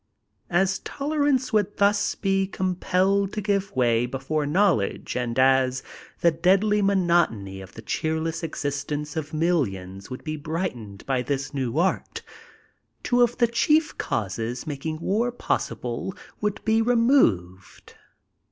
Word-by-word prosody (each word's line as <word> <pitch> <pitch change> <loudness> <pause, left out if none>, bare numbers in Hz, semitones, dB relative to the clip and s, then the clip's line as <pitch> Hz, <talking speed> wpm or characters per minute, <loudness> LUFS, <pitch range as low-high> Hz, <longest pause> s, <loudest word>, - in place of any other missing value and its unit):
As 190 +2 +2
tolerance 285 -3 0
would 205 -1 +1
thus 205 0 +2
he 195 -1 +2
com 185 -1 -1
pelled 190 +2 +1
to 215 - -2
give 200 -3 -1
mray 120 -1 +2
hef 135 +2 -7
ore 155 -2 +1
knowledge 165 - +1
and 120 -1 -2
as 130 -1 +3 0.4
the 170 - +5
deadly 195 +5 +3
monotony 170 - +1
of 95 0 -12
Ike 115 - -10
ckeeiiess 160 +4 -2
existence 145 -1 -3
of 155 -2 -3
mfllions 100 - -1
would 130 - -7
he 155 0 -3
hrigktened 145 - -4
hy 130 -2 +1
this 135 +1 -3
new 130 -1 -2
art, 180 +3 0 0.8
two 245 0 +2
of 240 0 +4
Ike 235 -1 +3
ckirf 305 +6 +2
causes 110 +5 -3
making 155 +1 -4
war 230 +7 +1
possihle 125 - -3 0.2
would 210 -1 -1
he 220 +1 +3
removed. 225 - +1
160 Hz, 135 wpm, -25 LUFS, 130-200 Hz, 0.8 s, the